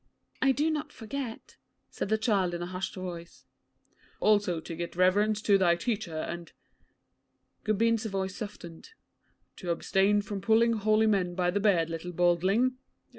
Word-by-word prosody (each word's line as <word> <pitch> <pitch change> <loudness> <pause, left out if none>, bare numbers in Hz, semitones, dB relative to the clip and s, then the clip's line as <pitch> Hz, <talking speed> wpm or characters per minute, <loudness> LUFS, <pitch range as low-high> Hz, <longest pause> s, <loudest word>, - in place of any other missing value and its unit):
'I 265 0 +4
do 305 +4 +1
not 300 -1 -3
forget,' 250 -1 -7 0.3
said - - -4
the 220 - +3
child 200 -6 +1
in 175 - -4
a - - -3
hushed 185 +1 -5
voice. 175 -2 -8 0.7
'Also 205 -5 +2
to 165 +1 -7
give 170 +1 -6
reverence 205 +4 +3
to 200 -2 +4
thy 175 -2 +4
teacher, 190 -3 -3
and' 170 +2 -5 1.1
Gobind's 225 +1 +1
voice 190 -2 -3
softened 185 - -9 0.6
'to 180 - -6
abstain 195 +4 +2
from 200 -1 -5
pulling 225 +3 +4
holy 215 0 +2
men 190 -5 +1
by 180 -1 +1
the 205 - 0
beard, 175 -6 +2
little 165 +2 -5
badling. 185 +9 +2
195 Hz, 150 wpm, -29 LUFS, 175-220 Hz, 1.1 s, I